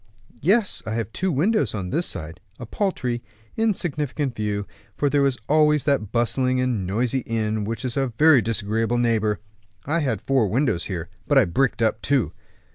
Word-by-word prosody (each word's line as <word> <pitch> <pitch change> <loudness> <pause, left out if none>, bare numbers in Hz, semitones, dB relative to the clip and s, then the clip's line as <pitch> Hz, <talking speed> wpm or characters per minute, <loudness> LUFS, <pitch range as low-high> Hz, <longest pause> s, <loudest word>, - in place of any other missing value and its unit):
"Yes, 205 +5 +2
I 110 - -2
have 115 -1 -3
two 190 0 0
windows 150 - +1
on 95 -3 -4
this 170 +4 +1
side, 80 +2 -6 0.2
a 120 - -7
paltry, 125 - -2 0.3
insignificant 150 - -1
view, 105 -2 -2 0.3
for 145 -1 +1
there 145 -1 +3
is 130 -2 -1
always 150 -1 +4
that 135 -9 0
bustling 125 +2 +1
and 120 -7 0
noisy 120 +6 0
inn, 110 -2 -1
which 115 +4 -4
is 125 - -2
a 135 -1 +1
very 155 -4 +6
disagreeable 115 +1 0
neighbor. 110 -3 +1 0.5
I 160 +4 +1
had 130 -8 0
four 130 -5 +2
windows 115 - 0
here, 85 -4 -4 0.2
but 145 - +3
I 130 - +6
bricked 120 +5 +1
up 110 0 +1
two." 130 - +1
125 Hz, 175 wpm, -23 LUFS, 110-145 Hz, 0.5 s, very